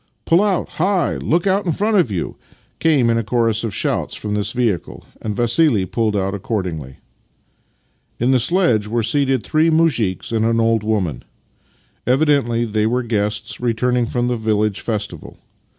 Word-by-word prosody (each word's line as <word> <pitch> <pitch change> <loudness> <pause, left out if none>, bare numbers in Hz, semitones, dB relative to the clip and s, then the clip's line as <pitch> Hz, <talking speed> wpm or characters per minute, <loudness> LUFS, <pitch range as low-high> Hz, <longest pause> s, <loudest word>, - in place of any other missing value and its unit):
Pull 170 +3 +4
out! 200 -4 +1
Hi! 185 -1 +1
Look 170 +4 0
out 195 0 +1
in 165 - +1
front 210 +5 0
of 175 - +3
you! 95 -5 -3 0.2
" - - -38
came 150 -7 +3
in 115 0 +2
a - - -2
chorus 115 0 0
of 115 - -2
shouts - - -1
from 105 -1 -4
this 105 -1 -1
vehicle, 115 - -2 0.2
and 105 -2 -3
Vassili 120 - +2
pulled 110 +2 -1
out 95 0 -1
accordingly. 90 - -4 1.2
In 120 +3 +2
the 130 - +4
sledge 125 - +2
were 115 +1 -1
seated 135 +1 +1
three 155 +2 +2
muzhiks 135 - +1
and 110 -1 +1
an 115 0 +2
old 115 -1 +2
woman. 95 - -1 0.8
Evidently 130 -4 +2
they 110 -1 0
were 125 +2 0
guests 105 -1 -2
returning 125 0 +1
from 120 0 -1
the 125 - 0
village 110 -2 0
festival. 110 -3 -5
115 Hz, 165 wpm, -19 LUFS, 105-140 Hz, 1.2 s, Pull